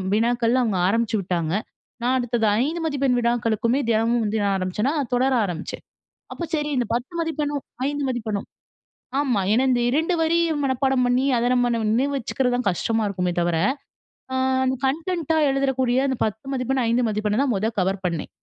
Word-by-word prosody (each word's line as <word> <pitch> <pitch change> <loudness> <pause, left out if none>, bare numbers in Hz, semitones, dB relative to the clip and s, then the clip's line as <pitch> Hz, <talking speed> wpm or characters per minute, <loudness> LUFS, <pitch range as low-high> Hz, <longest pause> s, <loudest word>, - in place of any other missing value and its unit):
வினாக்கள்லாம் 240 +2 +2
அவங்க 195 -5 0
ஆரம்பிச்சு 230 +1 +1
விட்டாங்க. 175 -3 -2 0.5
நான் 255 +2 +2
அடுத்தது 240 -2 0 0.2
5 320 +5 -2
மதிப்பெண் 275 -4 +1
வினாக்களுக்குமே 235 +1 +1
தினமும் 230 +1 +2
வந்து 215 +1 -1
நான் 200 -1 +1
ஆரம்பிச்சேனா, 210 - -1 0.2
தொடர 260 +2 +2
ஆரம்பிச்சேன். 175 -1 -6 0.5
அப்போ 345 - -6
சரி 300 -1 -1
இந்த 245 - +1
10 245 +7 -4
மதிப்பெண்ணும், 300 -3 -2 0.3
5 290 0 -2
மதிப்பெண்ணும், 220 -5 -3 0.7
ஆமா 255 -8 +1
ஏன்னா 245 +4 +3
இந்த 245 -1 +2
2 320 +6 +1
வரி 325 +1 +2 0.3
மனப்பாடம் 265 -1 +1
பண்ணி 250 +2 +2
அத 240 +1 +1
நம்ம 245 -1 +2 0.2
நினைவு 270 +5 +1
வச்சுக்கிறது 250 0 -1
தான் 245 -2 -2
கஷ்டமா 225 +5 0
இருக்குமே 180 -3 -1
தவிர, 170 -1 +1 0.8
ஆ - - -2 0.5
கன்டென்ட்டா 320 +3 0
எழுதறக்கூடிய 265 -2 +1
அந்த 260 -2 -2
10 220 +2 -3
மதிப்பெண்ணு, 255 0 0
5 235 +1 +2
மதிப்பெண்ண 210 +2 0
தான் 275 -3 +1
மொத 215 +4 0
கவர் 190 +1 -1
பண்ணேன். 170 -3 -3
245 Hz, 160 wpm, -23 LUFS, 215-270 Hz, 0.8 s, ஏன்னா